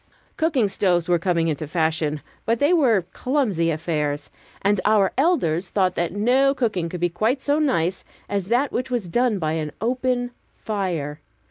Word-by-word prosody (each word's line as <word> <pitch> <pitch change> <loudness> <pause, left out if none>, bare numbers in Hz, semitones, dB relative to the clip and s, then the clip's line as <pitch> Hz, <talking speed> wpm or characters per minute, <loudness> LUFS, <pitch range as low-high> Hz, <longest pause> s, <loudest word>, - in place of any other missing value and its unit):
Cooking 300 -9 +2
stoves 180 -4 +1
were 175 -1 +3
coming 170 -1 +1
into 155 -1 -2
fashion, 160 -2 0 0.2
but 230 +1 +1
they 290 +8 +3
were 240 - +3
clumsy 230 - 0
affairs, 150 -2 -2 0.3
and 200 -1 +2
our 205 -2 +3
elders 195 - +1
thought 185 -2 +1
that 175 -1 -1
no 255 +7 +3
cooking 200 -10 -1
could 180 - -5
be 175 - +3
quite 215 +10 0
so 290 +3 +1
nice 190 - 0 0.2
as 200 -2 -2
that 250 +5 +1
which 255 +1 -2
was 240 -7 -2
done 240 +4 +1
by 155 -4 -1
an 155 -2 -2
open 245 +1 -1 0.2
fire. 175 -9 -3
195 Hz, 165 wpm, -23 LUFS, 165-245 Hz, 0.3 s, were